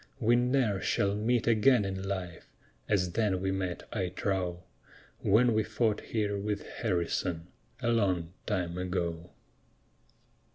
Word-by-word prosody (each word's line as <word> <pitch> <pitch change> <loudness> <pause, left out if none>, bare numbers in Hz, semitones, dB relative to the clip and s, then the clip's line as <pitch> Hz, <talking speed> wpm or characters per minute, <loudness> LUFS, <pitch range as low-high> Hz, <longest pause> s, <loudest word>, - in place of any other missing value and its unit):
We 120 -1 +4
ne'er 120 -5 +2
shall 100 0 +1
meet 110 +3 +1
again 115 0 +4
in 95 -1 -3
life 95 -3 -5 0.4
As 90 -4 +2
then 105 -2 +1
we 95 +1 -1
met, 95 -2 -3
I 95 -5 -1
trow, 90 -2 -2 0.6
When 115 +4 +4
we 110 - +3
fought 110 0 0
here 105 -3 -1
with 105 0 -3
Harrison, 90 -4 -2 0.3
A 120 - +2
long 90 -7 +1
time 90 -4 -1
ago. 90 -2 -2
100 Hz, 130 wpm, -30 LUFS, 90-110 Hz, 0.6 s, We